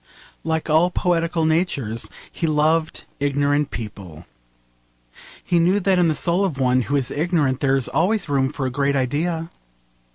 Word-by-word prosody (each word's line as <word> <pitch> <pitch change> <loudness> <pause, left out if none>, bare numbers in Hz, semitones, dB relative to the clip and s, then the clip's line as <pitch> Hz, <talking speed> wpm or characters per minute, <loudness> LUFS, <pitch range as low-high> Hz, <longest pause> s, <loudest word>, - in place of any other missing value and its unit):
Like 160 0 -2
all 160 +3 +4
poetical 170 -2 0
natures 150 - 0 0.2
he 165 - -2
loved 155 +1 +1 0.2
ignorant 145 +1 +1
people. 95 -7 -8 1.2
He 175 - +1
knew 180 +4 +3
that 190 -1 +2
in 175 - +4
the 155 - +1
soul 175 +5 +1
of 175 -8 -1
one 130 -1 +2
who 140 +4 -2
is 135 -3 0
ignorant 150 -4 0
there 135 -2 +2
is 130 - -1
always 195 +4 0
room 135 -2 +1
for 145 -2 -4
a 130 - -2
great 140 +2 0
idea. 160 +6 -1
150 Hz, 160 wpm, -21 LUFS, 135-170 Hz, 1.2 s, all